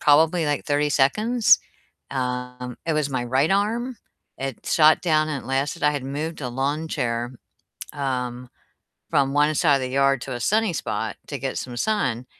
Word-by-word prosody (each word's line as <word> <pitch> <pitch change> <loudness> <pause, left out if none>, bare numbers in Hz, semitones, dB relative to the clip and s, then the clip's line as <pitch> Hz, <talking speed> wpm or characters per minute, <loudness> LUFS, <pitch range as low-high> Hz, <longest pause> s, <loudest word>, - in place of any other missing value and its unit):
probably, 160 +3 +4
like, 145 -1 -1
30 145 0 +1
seconds. 215 - +4 0.5
Um, 125 -1 -4
it 160 - +2
was 150 -2 0
my 130 -2 -1
right 130 +5 +2
arm, 230 +5 0 0.4
it 135 -3 -5
shot 155 -1 +5
down 155 -3 +2
and 140 -3 -3
it - - -12
lasted 135 +2 -1
I 150 - +5
had 145 -3 -3
moved 150 +4 -4
a 125 - -3
lawn 140 +6 -2
chair, 120 -1 -2 0.6
um, 125 -3 -3 0.6
from 135 0 +2
one 150 +1 +3
side 145 -2 +4
of 135 - -5
the 130 - -3
yard 135 0 +2
to 130 - -5
a 120 - -4
sunny 215 - +2
spot - - -3
to - - -5
get - - -3
some 125 -1 -5
sun, 125 - 0
140 Hz, 180 wpm, -23 LUFS, 130-155 Hz, 0.6 s, shot